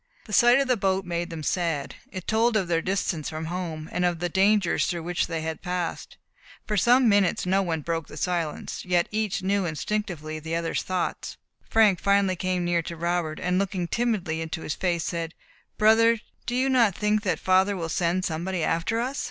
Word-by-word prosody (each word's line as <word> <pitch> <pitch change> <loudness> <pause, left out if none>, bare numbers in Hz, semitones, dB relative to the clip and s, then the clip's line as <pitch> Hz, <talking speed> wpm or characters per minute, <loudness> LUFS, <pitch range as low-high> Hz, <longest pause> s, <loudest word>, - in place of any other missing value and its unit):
The 210 - -9
sight 240 +5 +6
of 275 - +1
the 250 - +3
boat 190 -2 0
made 170 0 -3
them 165 -2 -6
sad. 165 -4 -1 0.2
It 185 -2 -6
told 225 +1 +2
of 190 -4 0
their 165 -1 +1
distance 180 -4 -1
from 155 0 -5
home, 165 -2 -4
and 180 - -1
of 175 -1 +1
the 175 +1 -2
dangers 195 0 +2
through 170 -2 -3
which 175 +1 -1
they 165 -2 -3
had 160 0 -4
passed. 180 -2 -4 0.5
For 210 - -2
some 245 +6 +5
minutes 200 -5 +3
no 190 +2 +2
one 165 -4 -2
broke 165 0 -3
the - - -11
silence; 170 -4 -2
yet 175 -2 +1
each 215 -3 -1
knew 195 -1 +1
instinctively 160 -2 -3
the 160 +1 -4
other's 170 -1 -1
thoughts. 185 -1 -3 0.3
Frank 215 -5 +4
finally 200 -1 +2
came 180 0 -1
near 175 -1 +1
to 170 +1 -7
Robert, 170 -2 -1
and 180 +1 0
looking 190 -3 -1
timidly 195 -8 -1
into 160 0 -4
his 150 - -2
face, 175 -3 -1
said, 165 -1 -4 0.4
"Brother, 225 +2 +5 0.3
do 245 - -1
you 260 +2 +2
not 235 -8 +3
think 210 0 +1
that 190 -4 0
father 190 +2 +2
will 165 -2 -3
send 175 +3 0
somebody 170 +2 -2
after 170 +9 0
us?" 260 +4 -2
180 Hz, 200 wpm, -26 LUFS, 165-205 Hz, 0.5 s, sight